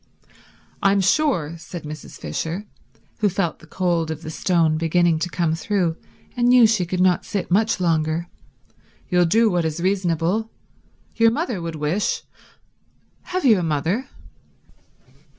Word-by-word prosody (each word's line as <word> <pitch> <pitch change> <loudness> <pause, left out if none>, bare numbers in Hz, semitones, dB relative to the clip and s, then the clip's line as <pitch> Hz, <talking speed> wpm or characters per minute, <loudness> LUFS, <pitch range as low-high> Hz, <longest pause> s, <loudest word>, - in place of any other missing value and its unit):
"I'm 200 0 +3
sure," 190 - +1
said 175 +1 -8
Mrs. 150 -1 -9
Fisher, 175 +6 -4 0.5
who 210 -2 +3
felt 175 -4 -2
the 160 - -16
cold 170 -3 0
of 160 0 -5
the 155 - -6
stone 165 -2 +1
beginning 165 0 +2
to 180 - -2
come 165 0 0
through 175 -1 0 0.4
and 240 -1 +2
knew 245 -1 +7
she 215 -5 +2
could 180 +1 -2
not 180 -1 +3
sit 200 -5 -4
much 215 +3 +2
longer, 165 -1 0 0.8
"you'll 180 -2 +3
do 225 +7 +3
what 175 -1 +1
is 160 0 -2
reasonable. 185 +3 0 0.7
Your 230 0 +6
mother 235 - -2
would 165 -1 -5
wish—have 200 - -5
you 220 -7 +6
a - - -1
mother?" 170 - -1
175 Hz, 140 wpm, -22 LUFS, 165-205 Hz, 0.8 s, knew